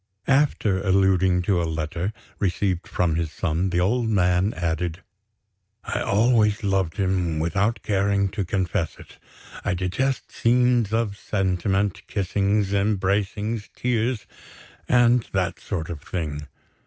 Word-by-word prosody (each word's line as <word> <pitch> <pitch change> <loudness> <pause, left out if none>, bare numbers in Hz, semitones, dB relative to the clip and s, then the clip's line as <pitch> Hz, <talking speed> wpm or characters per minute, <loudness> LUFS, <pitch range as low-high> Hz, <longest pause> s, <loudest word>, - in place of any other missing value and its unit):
After 135 -9 +2
alluding 95 -2 +3
to 90 -1 +1
a - - 0
letter, 80 +4 -2 0.3
received 95 -2 0
from 85 -3 0
his 85 -2 -2
son, 85 +2 -1
the 90 -1 0
old 110 +6 +1
man 90 -1 +2
added: 85 +1 -2 0.8
"I - - -2
always 105 0 +2
loved 95 -4 0
him, 90 -4 0
without 100 +8 0
caring 100 -1 +1
to 100 +1 -3
confess 90 -1 -1
it; - - -15 0.4
I - - 0
detest 110 +10 -1
scenes 120 -2 +2
of 110 -3 0
sentiment, 95 0 -1
kissings, 100 +1 0
embracings, 100 +2 0
tears, 120 -2 -1 0.6
and 120 -1 +4
that 95 -1 -1
sort 85 -6 -4
of 75 -3 -6
thing. 75 -4 -4
95 Hz, 125 wpm, -24 LUFS, 90-105 Hz, 0.8 s, and